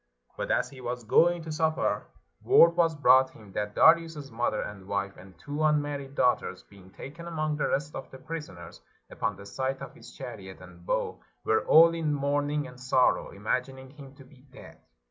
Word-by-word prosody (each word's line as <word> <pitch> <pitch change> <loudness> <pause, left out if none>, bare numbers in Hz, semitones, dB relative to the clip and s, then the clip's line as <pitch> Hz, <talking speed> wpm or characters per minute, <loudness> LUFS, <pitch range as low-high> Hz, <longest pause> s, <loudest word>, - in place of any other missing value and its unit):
But - - -4
as - - 0
he 130 -2 -12
was 125 0 -4
going 170 +9 +3
to 160 - -6
supper, 160 0 0 0.4
word 170 - +7
was 165 -2 +2
brought 130 -2 +5
him 105 -3 -16
that 105 +1 -4
Darius's 160 -4 +3
mother 115 -1 -1
and 100 -2 -9
wife 100 -1 -3
and 95 -1 -15
two 145 - -6
unmarried 145 -2 0
daughters, 125 -8 0
being 95 -2 -17
taken 165 - -10
among 155 -2 -2
the - - 0
rest 145 +2 -2
of 135 - -7
the 130 - -11
prisoners, 130 - -9 0.3
upon 105 -3 -2
the 100 +1 -12
sight 130 +5 -3
of - - -9
his - - -14
chariot 95 -1 -9
and 90 -1 -15
bow - - -2 0.2
were 110 - +1
all 165 +1 +7
in 160 -3 -1
mourn 145 +1 0
ing 150 0 -1
and 125 - -12
sorrow, 130 0 +2
imagining 130 +6 -4
him 140 -2 -13
to 135 - -14
be 130 +1 -20
dead. 135 - -14
135 Hz, 190 wpm, -28 LUFS, 110-150 Hz, 0.4 s, word